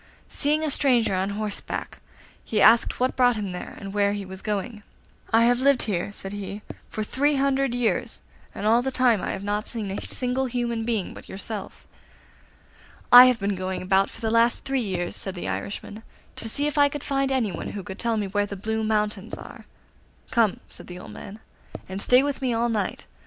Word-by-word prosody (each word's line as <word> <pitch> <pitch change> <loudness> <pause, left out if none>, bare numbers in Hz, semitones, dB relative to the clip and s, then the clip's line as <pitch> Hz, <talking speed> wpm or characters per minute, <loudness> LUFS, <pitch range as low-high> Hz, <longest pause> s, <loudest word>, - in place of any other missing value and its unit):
Seeing 300 +2 +1
a 310 - -1
stranger 245 -7 +2
on 190 +1 0
horseback, 210 0 -5 0.4
he 215 - -1
asked 225 +3 +5
what 255 +1 +1
brought 245 -2 +4
him 205 -3 -4
there 180 - -7
and 195 -1 -8
where 205 -1 +2
he 205 -1 -4
was 190 0 -9
going. 210 +1 -3 0.5
'I 225 +1 +5
have 240 +1 +4
lived 275 -1 +5
here,' 195 -2 0
said 195 -1 0
he, 205 +1 -6 0.3
'for 215 - -3
three 285 +7 +1
hundred 275 -2 +1
years, 245 -2 -1 0.4
and - - -5
all 230 +3 +5
that 265 +1 -1
time 245 -6 +4
I - - -3
have 195 - -4
not 205 +1 -2
seen 215 -5 -4
a 195 - -4
single 260 +1 -1
human 235 -2 -2
being 225 -5 -1
but - - -12
yourself.' 200 +1 -6 1.3
'I 245 +1 +12
have 250 -2 +3
been 200 0 -1
going 185 0 -4
about 190 +1 +3
for - - -12
the 220 -1 -1
last 230 +1 +3
three 270 -1 0
years,' 180 -5 -3
said 190 -1 -4
the 175 - -5
Irishman, 205 +1 -5 0.3
'to 225 - -4
see 285 +6 0
if 295 0 0
I 285 0 +6
could 290 0 -6
find 275 -1 0
anyone 225 -10 -2
who 200 - -5
can 190 0 -8
tell 230 0 0
me 210 - -1
where 205 +1 -1
the 200 - -6
Blue 220 +3 -2
Mountains 210 -1 -1
are.' - - -12 0.6
'Come 225 -5 +3
in,' - - -16
said - - -10
the 180 - -8
old 180 - -10
man, 205 +2 -10 0.5
'and 190 +1 -5
stay 250 +4 +5
with 285 -1 -2
me 250 -3 0
all 235 +1 +1
night. 210 -4 -2
220 Hz, 210 wpm, -25 LUFS, 200-250 Hz, 1.3 s, I